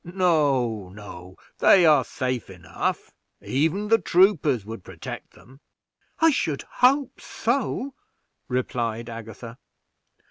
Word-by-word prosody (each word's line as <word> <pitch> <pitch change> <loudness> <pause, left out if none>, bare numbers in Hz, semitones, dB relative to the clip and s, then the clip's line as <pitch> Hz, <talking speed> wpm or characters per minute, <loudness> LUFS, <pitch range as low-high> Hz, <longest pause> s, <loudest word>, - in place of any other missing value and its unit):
No, 145 - +1
no, 95 -2 -11 0.2
they 185 -3 +6
are 155 -2 +5
safe 130 -4 -3
enough; 90 -3 -4 0.3
even 165 +10 -1
the 225 0 +5
troopers 165 - +3
would 110 -3 -8
protect - - -9
them." 130 +3 -18 0.6
"I 325 0 +5
should 155 - -1
hope 270 +1 +1
so," 260 +3 -2 0.5
replied 120 -2 -2
Agatha. 115 +1 -9
135 Hz, 105 wpm, -24 LUFS, 115-185 Hz, 0.6 s, they